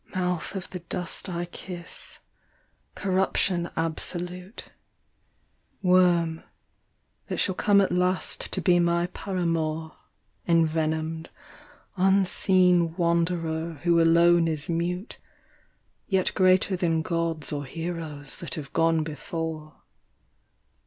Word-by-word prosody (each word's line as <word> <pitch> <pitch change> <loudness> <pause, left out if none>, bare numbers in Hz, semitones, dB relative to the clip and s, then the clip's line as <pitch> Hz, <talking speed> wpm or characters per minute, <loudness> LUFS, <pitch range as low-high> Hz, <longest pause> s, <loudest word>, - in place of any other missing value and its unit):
III. - - 0
MOUTH 180 +1 -2
of 190 -1 -5
the 180 - -5
dust 175 +2 -4
I 175 -1 -3
kiss, 175 0 -7 0.8
corruption 185 -2 +1
absolute, 180 +4 -2 1.1
Worm, 175 -3 +3 0.9
that - - -3
shall 190 - +1
come 200 +2 +3
at 195 - +1
last 180 +1 -1
to - - -1
be 175 -1 +4
my 170 0 +2
paramour, 165 -4 -2 0.5
Envenomed, 160 -1 +1 0.7
unseen 185 -2 +3
wanderer 170 -1 0
who 170 -1 +4
alone 170 +1 +5
is 155 -2 -2
mute, 175 +5 -3 0.9
Yet 190 -2 +1
greater 185 0 +3
than 165 -3 0
gods 165 -3 -2
or 145 -1 -3
heroes 160 -2 -6
that 170 - -6
have 145 -3 -8
gone 165 -1 +3
before. 160 -1 -6
170 Hz, 105 wpm, -26 LUFS, 160-180 Hz, 1.1 s, alone